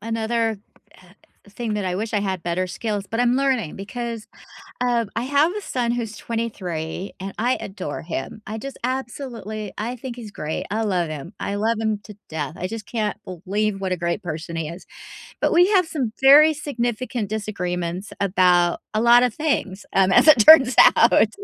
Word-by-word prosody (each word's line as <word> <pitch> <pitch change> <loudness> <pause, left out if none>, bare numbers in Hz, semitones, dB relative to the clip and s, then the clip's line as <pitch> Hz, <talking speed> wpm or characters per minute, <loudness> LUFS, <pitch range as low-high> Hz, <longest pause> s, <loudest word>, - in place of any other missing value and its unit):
another, 225 0 -1 0.4
uh, 185 - -20 0.4
thing 225 +1 -4
that 205 -2 -2
I 180 -1 -1
wish 215 +4 -3
I 210 - +1
had 190 -3 -3
better 175 +2 -1
skills 205 +2 -3
but 225 - -1
I'm 245 0 +3
learning, 260 - 0
because, 230 +2 -6 0.5
um, 240 -3 0
I 235 - -1
have 285 +5 +2
a 420 - -3
son 245 -10 -1
who's 225 -3 -4
23, 190 -7 -4
and 195 +1 -6
I 245 +3 +1
adore 190 -7 -6
him. 165 +5 -5
I 215 +2 -4
just 270 +4 -7
absolutely 240 -4 -4
I 235 +4 -3
think 250 0 -7
he's 230 -4 -9
great, 155 -5 -4
I 220 +2 0
love 180 -6 0
him, 155 +5 -7
I 200 - -3
love 220 +2 0
him 220 -2 -1
to 210 - -11
death. 155 -1 -4
I 185 - -3
just 220 0 -7
can't 215 -3 -2
believe 195 +3 -2
what 190 -1 -2
a 185 - 0
great 170 +4 -2
person 165 0 -5
he 160 -2 -3
is, 170 +3 -10 0.6
but - - +2
we 350 +2 +6
have 375 -5 +3
some 265 -9 -2
very 295 +4 +8
significant 245 -6 -3
disagreements 180 -3 -4
about 180 -3 +3
a 215 - +1
lot 240 +1 +6
of 250 -3 +1
things, 240 -11 -2
um, 190 -1 +4
as 190 - +5
it 300 -6 +8
turns 270 -6 +8 0.2
out. - - +5
215 Hz, 190 wpm, -22 LUFS, 185-240 Hz, 0.6 s, very